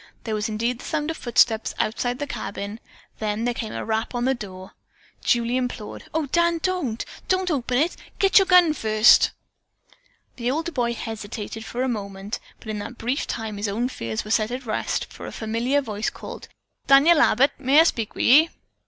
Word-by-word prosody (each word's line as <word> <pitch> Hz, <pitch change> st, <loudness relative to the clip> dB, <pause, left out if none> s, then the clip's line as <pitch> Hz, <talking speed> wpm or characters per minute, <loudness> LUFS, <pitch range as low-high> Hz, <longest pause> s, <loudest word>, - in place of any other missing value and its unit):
There 220 Hz, -, -3 dB
was 215 Hz, +1 st, -1 dB
indeed 230 Hz, +3 st, -1 dB
the -, -, -10 dB
sound 310 Hz, 0 st, -1 dB
of 325 Hz, -, -7 dB
footsteps 230 Hz, -2 st, +2 dB
outside 245 Hz, +3 st, -1 dB
the 290 Hz, -, -3 dB
cabin, 205 Hz, -5 st, -5 dB, 0.4 s
then 215 Hz, +1 st, -1 dB
there 245 Hz, -, +1 dB
came 225 Hz, -2 st, -5 dB
a -, -, -5 dB
rap 220 Hz, +2 st, -2 dB
on 240 Hz, 0 st, 0 dB
the 265 Hz, -, +3 dB
door. 190 Hz, -5 st, -9 dB, 0.5 s
Julie 240 Hz, +1 st, +2 dB
implored: 250 Hz, -4 st, -4 dB
"O 320 Hz, -1 st, 0 dB
Dan, 340 Hz, +3 st, +2 dB
don't! 345 Hz, -12 st, -1 dB, 0.2 s
don't 370 Hz, -1 st, +1 dB
open 250 Hz, -4 st, 0 dB
it! 320 Hz, +6 st, +1 dB, 0.2 s
Get 390 Hz, +1 st, +6 dB
your 385 Hz, -, +2 dB
gun 355 Hz, -4 st, +6 dB
first!" 215 Hz, -4 st, +5 dB, 1.1 s
The 240 Hz, -1 st, -1 dB
older 320 Hz, +5 st, -1 dB
boy 240 Hz, -5 st, -1 dB
hesitated 220 Hz, -1 st, -6 dB
for 245 Hz, +3 st, -3 dB
a -, -, 0 dB
moment, 200 Hz, -2 st, -4 dB, 0.2 s
but 220 Hz, -, -11 dB
in 215 Hz, -1 st, -3 dB
that 210 Hz, +4 st, -7 dB
brief 250 Hz, +5 st, -2 dB
time 220 Hz, -2 st, -4 dB
his 205 Hz, +1 st, -2 dB
own 230 Hz, +5 st, -1 dB
fears 115 Hz, -, -4 dB
were 215 Hz, -, -6 dB
set 215 Hz, -1 st, +2 dB
at 250 Hz, +1 st, -5 dB
rest, 215 Hz, -, -1 dB
for -, -, -8 dB
a -, -, -6 dB
familiar 235 Hz, +6 st, 0 dB
voice 215 Hz, -4 st, -2 dB
called, -, -, -9 dB, 0.4 s
"Daniel 300 Hz, +4 st, +6 dB
Abbott, 275 Hz, -2 st, +4 dB
may 275 Hz, +4 st, +5 dB
I -, -, +9 dB
speak 230 Hz, -10 st, -1 dB
with -, -, -1 dB
ye?" 305 Hz, +6 st, +7 dB
240 Hz, 195 wpm, -24 LUFS, 215-280 Hz, 1.1 s, I